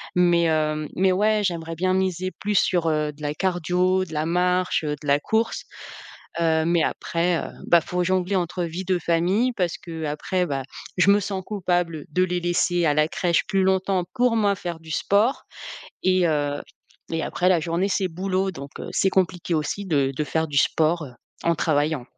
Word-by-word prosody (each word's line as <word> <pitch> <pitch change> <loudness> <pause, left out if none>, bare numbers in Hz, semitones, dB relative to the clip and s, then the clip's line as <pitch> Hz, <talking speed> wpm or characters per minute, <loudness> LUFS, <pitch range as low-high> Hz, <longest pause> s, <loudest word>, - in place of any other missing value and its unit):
mais 170 -2 +4
heu 155 -1 0
mais 190 +1 +3
ouais, 210 +3 +2
j'aimerais 165 -3 -2
bien 185 +3 +1
miser 185 -1 -1
plus 205 -1 0
sur, 175 -3 +2
heu, 150 -1 0
de 150 +1 -18
la 145 0 -2
cardio, 180 +1 +1
de 160 - -11
la 155 0 -1
marche, 180 0 +1
heu, 150 0 -1
de 145 - -8
la 140 +1 +4
course. 220 +8 -1 0.8
Heu, 160 -1 +2
mais 170 -2 +2
après, 170 0 0
heu, - - -5 0.2
bah, 170 - +5
faut 180 +2 -2
jongler 185 +1 +1
entre 175 0 -1
vie 170 +3 -4
de 185 -1 +1
famille, 180 +9 +1
parce 175 -3 0
que 165 -2 -7
après, 165 +5 -1
bah, 135 -3 -2 0.4
je 200 +2 +5
me 205 - +5
sens 195 -1 -3
coupable 175 -6 -1
de 180 +4 +1
les 180 -1 0
laisser 175 0 +1
à 150 - +3
la 150 +1 +3
crèche 170 0 +1
plus 195 -2 +2
longtemps, 190 -1 +1
pour 245 -2 +2
moi 205 -2 +3
faire 175 -3 -6
du 160 -1 -13
sport 205 - +1 0.6
et 185 -1 +3
heu 145 -2 0 0.5
et 165 -1 -1
après 180 +1 0
la 185 - +4
journée 170 +4 -1
c'est 190 -1 0
boulot, 190 +2 -1
donc 140 -5 -9
heu, - - -6
c'est 195 - +2
compliqué 180 -2 0
aussi 155 +6 -2
de 140 -6 +1
de 150 +3 -1
faire 160 +1 -1
du 145 -2 0
sport, 160 +2 +2
heu, 125 - -11 0.3
en 170 0 +3
travaillant. 150 -4 0
175 Hz, 200 wpm, -24 LUFS, 160-185 Hz, 0.8 s, bah